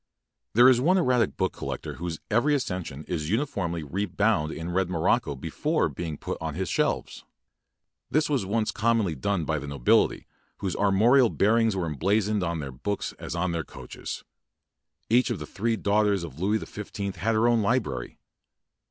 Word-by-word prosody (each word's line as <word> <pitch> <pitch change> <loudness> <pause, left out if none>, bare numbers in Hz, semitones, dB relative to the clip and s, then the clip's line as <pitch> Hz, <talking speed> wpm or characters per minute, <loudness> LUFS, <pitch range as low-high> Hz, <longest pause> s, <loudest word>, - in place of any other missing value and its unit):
There 120 +2 +8
is 125 -2 +5
one 180 +7 +4
erratic 125 -9 +2
book 95 -2 0
collector - - -5
whose 85 -1 -4
every 135 +7 +3
accession 90 - -3
is 80 -3 -3
uniformly 95 - -1
re 95 +8 -2
bound 90 -4 +1
in 85 +2 -5
red 95 0 +1
morocco 80 -4 +1
before 65 - -1
being 80 -4 -5
put - - -5
on 80 -2 -3
his 95 +1 -2
shelves., - - -1 0.9
This 155 0 +2
was 140 -7 0
once 110 +3 0
com 115 +2 +2
monly 90 -6 -1
done 85 +4 -1
by 80 -1 0
the 70 - -7
nobilily, 70 -4 +2 0.3
whose 95 -3 -3
ar 100 - +2
morial 120 +6 +5
bearings 110 +1 +2
were 90 -3 -1
emblazoned 100 - +1
on 85 -2 -1
their 70 -2 -5
books 100 +11 -3
as - - -5
on 85 +1 0
their 85 -1 -2
coaches. - - -8 0.8
Each 120 +2 +3
of - - -1
the 75 - -6
three 115 +8 -1
daughters 105 -2 +2
of 80 -3 -8
Louis 100 +4 +2
the - - -6
Fifteenth 100 -2 -6
had 110 +6 0
her 110 +2 +3
own 120 -2 +3
library. 100 - -1
100 Hz, 180 wpm, -26 LUFS, 85-115 Hz, 0.9 s, There